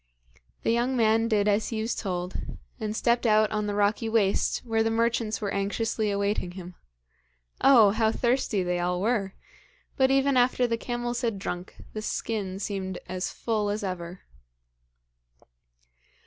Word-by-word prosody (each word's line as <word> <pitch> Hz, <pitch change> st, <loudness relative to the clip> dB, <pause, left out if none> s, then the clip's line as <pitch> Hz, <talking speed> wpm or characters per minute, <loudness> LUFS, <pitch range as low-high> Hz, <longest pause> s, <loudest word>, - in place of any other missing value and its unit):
The -, -, +2 dB
young 245 Hz, +3 st, +1 dB
man 225 Hz, 0 st, +3 dB
did 210 Hz, -2 st, +2 dB
as 210 Hz, +1 st, +2 dB
he 225 Hz, -, -3 dB
was 225 Hz, +2 st, -1 dB
told, 180 Hz, -2 st, -3 dB, 0.5 s
and 215 Hz, 0 st, -3 dB
stepped 235 Hz, +1 st, +2 dB
out 215 Hz, 0 st, +4 dB
on 210 Hz, -1 st, -1 dB
the 205 Hz, -, -2 dB
rocky 210 Hz, +2 st, +1 dB
waste, 220 Hz, +1 st, +1 dB
where 225 Hz, -1 st, +1 dB
the 225 Hz, -, +2 dB
merchants 230 Hz, -1 st, 0 dB
were 200 Hz, -2 st, -3 dB
anxiously 215 Hz, +2 st, -1 dB
awaiting 200 Hz, -2 st, -1 dB
him. 180 Hz, -1 st, -9 dB, 0.9 s
Oh, 230 Hz, -7 st, +7 dB
how 220 Hz, +1 st, +2 dB
thirsty 240 Hz, -5 st, 0 dB
they 180 Hz, 0 st, -1 dB
all 180 Hz, 0 st, 0 dB
were! 200 Hz, -2 st, 0 dB, 0.6 s
But 265 Hz, -2 st, +4 dB
even 270 Hz, 0 st, +3 dB
after 250 Hz, 0 st, +3 dB
the 230 Hz, -1 st, 0 dB
camels 240 Hz, 0 st, -3 dB
had 230 Hz, -4 st, -1 dB
drunk, 180 Hz, -2 st, -5 dB, 0.2 s
the 215 Hz, -, -4 dB
skin 205 Hz, -3 st, -3 dB
seemed 195 Hz, -2 st, -4 dB
as 185 Hz, 0 st, -3 dB
full 215 Hz, -3 st, -1 dB
as 210 Hz, +1 st, -2 dB
ever. 180 Hz, -1 st, -5 dB
215 Hz, 155 wpm, -27 LUFS, 195-230 Hz, 0.9 s, Oh